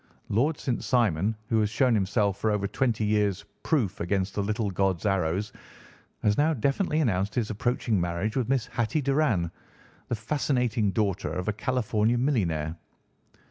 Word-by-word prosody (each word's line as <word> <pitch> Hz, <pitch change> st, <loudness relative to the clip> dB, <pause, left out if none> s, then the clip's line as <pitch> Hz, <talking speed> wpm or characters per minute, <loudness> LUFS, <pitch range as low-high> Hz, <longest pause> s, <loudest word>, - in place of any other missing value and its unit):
Lord 140 Hz, +9 st, +1 dB
St. 125 Hz, -3 st, -2 dB
Simon, 110 Hz, -4 st, +2 dB
who 110 Hz, -, +3 dB
has 105 Hz, -1 st, +2 dB
shown 125 Hz, +3 st, +2 dB
himself 100 Hz, -1 st, +1 dB
for 110 Hz, -, +1 dB
over 105 Hz, -2 st, 0 dB
twenty 110 Hz, +1 st, 0 dB
years 105 Hz, -2 st, +1 dB, 0.2 s
proof 115 Hz, -, 0 dB
against 95 Hz, +2 st, -1 dB
the 105 Hz, -, -1 dB
little 105 Hz, 0 st, -1 dB
god's 95 Hz, 0 st, 0 dB
arrows, 95 Hz, +1 st, 0 dB, 0.7 s
has 105 Hz, +3 st, +2 dB
now 155 Hz, +2 st, +3 dB
definitely 140 Hz, -, 0 dB
announced 105 Hz, -5 st, 0 dB
his 115 Hz, -3 st, 0 dB
approaching 110 Hz, -2 st, 0 dB
marriage 90 Hz, +6 st, -2 dB
with 125 Hz, -3 st, 0 dB
Miss 135 Hz, -4 st, +1 dB
Hatty 120 Hz, +7 st, -1 dB
Doran, 135 Hz, -, +1 dB, 0.6 s
the -, -, -1 dB
fascinating 120 Hz, -2 st, 0 dB
daughter 100 Hz, -1 st, -1 dB
of 90 Hz, +2 st, -3 dB
a -, -, 0 dB
California 115 Hz, -1 st, 0 dB
millionaire. 85 Hz, -, 0 dB
110 Hz, 155 wpm, -27 LUFS, 100-125 Hz, 0.7 s, who